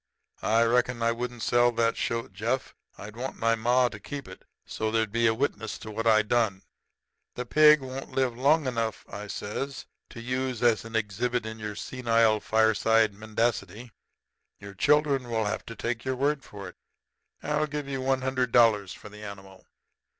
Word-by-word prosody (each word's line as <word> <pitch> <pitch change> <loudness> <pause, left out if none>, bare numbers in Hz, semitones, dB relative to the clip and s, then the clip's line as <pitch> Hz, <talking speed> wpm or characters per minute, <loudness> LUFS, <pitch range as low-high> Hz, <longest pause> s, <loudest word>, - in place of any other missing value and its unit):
I 115 - +5
reckon 120 0 +1
I 115 - +3
wouldn't 120 -1 -5
sell 120 0 +4
that 115 0 +2
shoat, 115 -3 -3
Jeff. 115 +7 -2 0.2
I'd 105 +2 -9
want 130 +3 -5
ma 115 +2 +2
to 105 -3 -8
keep 140 +4 -7
it, 95 - -11 0.2
so 110 - -3
there'd 110 -1 0
be 115 +1 +2
a 110 - +2
witness 110 -4 -2
to 110 - -9
what 115 +2 -2
I 110 -1 +5
done.' 110 -3 0 0.7
"'The 125 - -4
pig 150 +3 +6
won't 130 +1 -7
live 130 -3 0
long 145 +5 +3
enough,' 115 -3 -2
I 105 +1 -7
says, 125 +7 -5 0.2
'to - - -10
use 125 0 -3
as 115 -2 +3
an 115 0 -8
exhibit 115 +3 -1
in 110 0 -6
your 105 -1 -5
senile 115 -1 +1
fireside 110 0 +3
mendacity. 110 +1 -2 0.7
Your 100 0 -9
grandchildren 140 +2 +2
will 110 -2 0
have 105 - -2
to 115 - -7
take 115 +1 -3
your 130 0 -1
word 140 +1 0
for 100 -2 -9
it. 90 - -12 0.7
I'll 150 +1 0
give 150 -1 -5
you 135 -1 -3
one 130 0 +1
hundred 130 -2 0
dollars 110 -6 +4
for - - -12
the 105 +1 -12
animal.' 95 -2 -11
115 Hz, 180 wpm, -27 LUFS, 110-130 Hz, 0.7 s, pig